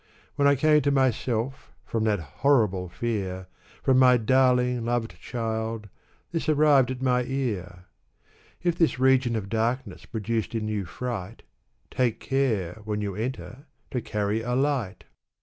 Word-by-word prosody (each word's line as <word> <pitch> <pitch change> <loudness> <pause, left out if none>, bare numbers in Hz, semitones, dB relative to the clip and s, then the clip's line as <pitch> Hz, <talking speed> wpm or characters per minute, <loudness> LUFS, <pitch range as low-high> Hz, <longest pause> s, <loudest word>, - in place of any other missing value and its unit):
When 140 -1 +3
I 140 - +5
came 150 +2 +4
to 145 - +1
myself, 130 -1 0
from 110 -1 -1
that 105 -2 +2 0.2
horrible 105 -10 +3
fear, 95 -3 -3 0.4
From 130 -1 +4
my 125 -1 +6
darling, 125 0 +3
loved 115 -7 -2
child, 110 -1 -3 0.4
this 165 -2 -2
arrived 145 -4 +4
at 130 0 -4
my 125 -1 +2
ear: 105 -10 -3 0.4
" - - -32
If 175 -1 0
this 165 -6 +3
region 130 -2 +3
of 105 -3 -3
darkness 115 0 -2
produced 115 0 -3
in 110 -1 -2
you 105 -3 -2
fright. 115 +1 -5 0.5
Take 125 -3 0
care, 110 -8 -1
when 105 0 -2
you 100 -2 -3
enter, 125 +6 -5 0.2
to 125 - -1
carry 105 +1 -1
a 125 +2 -2
light 130 -7 -1
120 Hz, 150 wpm, -26 LUFS, 105-130 Hz, 0.5 s, my